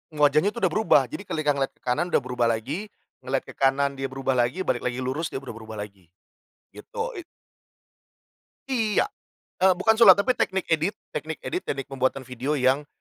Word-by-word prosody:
wajahnya 150 +3 +4
tuh 235 - -6
udah 185 - +3
berubah. 215 -5 +4
Jadi 200 - -7
kelika 155 -2 0
ngelihat 140 -1 -2
ke - - -36
kanan 125 +7 0
udah 160 - +1
berubah 125 -2 0
lagi, 130 - -2 0.3
ngelihat 130 +1 -2
ke - - -16
kanan 140 0 +1
dia 135 - -1
berubah 135 0 -2
lagi, 125 +10 +1
balik - - 0
lagi 125 0 -3
lurus 140 +6 -2
dia 135 - -6
berubah 115 -4 -8
rubah 110 -1 -7
lagi, 100 -4 -14 0.7
gitu. - - -5
Ik 355 - -7 1.4
Iya, 225 - +1 0.5
eee, 190 0 +5
bukan 220 +5 +3
sulap, 205 -6 +9
tapi 200 +5 +2
teknik 190 -6 -1
edit 160 +5 +1 0.2
teknik 160 0 -4
edit, 360 - -2
teknik 135 -1 -3
pembuatan 130 0 -1
video 130 +4 -2
yang 135 +2 +2
140 Hz, 185 wpm, -25 LUFS, 130-190 Hz, 1.4 s, sulap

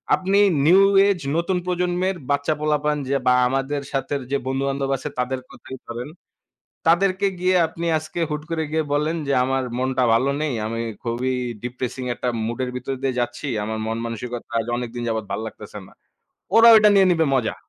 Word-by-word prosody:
আপনি 195 +2 +1 0.3
new 185 +4 +7 0.3
age 195 -3 +1 0.2
নতুন 180 +2 0
প্রজন্মের 180 +1 0
বাচ্চা-পোলাপান 150 +1 0
যে 140 - +2
বা 125 - +6
আমাদের 135 +2 -1
সাথের 140 +1 -2
যে 140 - +2
বন্ধু-বান্ধব 135 +1 -1
আছে 150 - -6
তাদের 130 +1 -1
কথাই 130 - -10
ধরেন। 120 +4 -6 0.8
তাদেরকে 190 +3 +3
গিয়ে 185 +1 +2
আপনি 165 +1 -6
আজকে 155 +2 -7
হুট 150 0 -3
করে 160 -1 0
গিয়ে 160 0 +1
বলেন 150 +3 0
যে 140 - +1
আমার 135 0 0 0.2
মনটা 130 0 0
ভালো 130 +4 +2
নেই। 155 -3 -1
আমি 115 +1 -3 0.2
খুবই 125 +2 -1 0.3
ডিপ্রিসিং 125 +1 -4
একটা 125 - -2 0.2
মুড 115 +2 -4
এর - - -5
ভিতর 130 +2 -4
দিয়ে 130 -2 -1
যাচ্ছি। 120 +4 -3 0.2
আমার 110 +1 -3
মন-মানসিকতা 115 +1 -4 0.2
আজ 115 - -2
অনেকদিন 120 0 -5
যাবত 110 -2 -2
ভাল্লাগতেছে 105 0 -6
না। - - -19 0.6
ওরা 230 +1 +8
ওইটা 210 -1 +6
নিয়ে 195 -1 +6
নিবে 165 -2 +2
মজা। 125 -4 -1
135 Hz, 170 wpm, -22 LUFS, 125-165 Hz, 0.8 s, ওরা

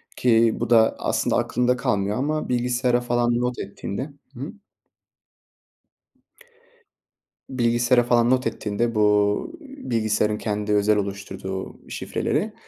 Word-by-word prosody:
ki 115 -2 +4
bu - - -2
da 110 -1 +5
aslında - - 0
aklında 125 +1 +1
kalmıyor 100 -3 0
ama 155 +4 -1
bilgisayara 125 0 +1
falan 120 0 +1
not 125 0 -2
ettiğinde 100 +7 -5 0.2
Hı - - -12
hı. 140 +5 -5 3.0
bilgisayara 120 -1 +2
falan 120 0 +3
not 130 0 +2
ettiğinde, 110 +2 -2
bu, 105 - +2
ııı, 275 -1 -11
bilgisayarın 110 -2 +1
kendi 105 -1 -2
özel 105 +1 +3
oluşturduğu 95 -1 -5
şifreleri, - - -2
120 Hz, 115 wpm, -23 LUFS, 105-125 Hz, 3.0 s, da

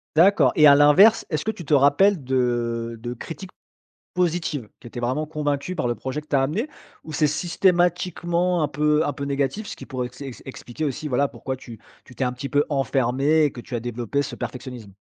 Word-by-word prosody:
D'accord 165 -6 +5
et 150 -1 +7
à 140 - +8
l'inverse, 150 +11 +6
est-ce 155 -1 -1
que - - -2
tu 175 -6 -10
te 150 - 0
rappelles 145 +6 +4
de 120 -2 -1
de 120 +1 -4
critiques 165 +9 -8 0.6
positives, 165 - -1
qui - - -13
étaient 120 +1 -7
vraiment 130 +6 -1
convaincu 150 +2 -2
par 125 - -1
le 120 - 0
projet 130 +6 -5
que 150 - -21
tu 145 - +1
as 135 - +3
amené? 180 - -1 0.4
Ou 155 - -8
c'est 150 - +3
systématiquement 175 +1 +1
un 150 - +1
peu 150 +2 +2
un 145 - -2
peu 140 - -5
négatif? 140 - -2
Ce - - -7
qui - - -11
pourrait 125 -3 -4
ex 125 +2 -17
ex 135 -3 -8
expliquer 135 +2 -7
aussi, 150 +1 -3
voilà, 140 +1 +2
pourquoi 130 0 -6
tu 120 -4 -12 0.2
tu 125 - -16
t'es 130 - -2
un 125 - -1
petit 140 +2 -6
peu 145 0 +2
enfermé 135 +2 +1
et 145 - +2
que 120 - -9
tu 125 - -9
as 120 - -1
développé 120 +3 -2
ce 145 - -4
perfectionnisme. 125 -5 -7
140 Hz, 220 wpm, -23 LUFS, 125-160 Hz, 0.6 s, à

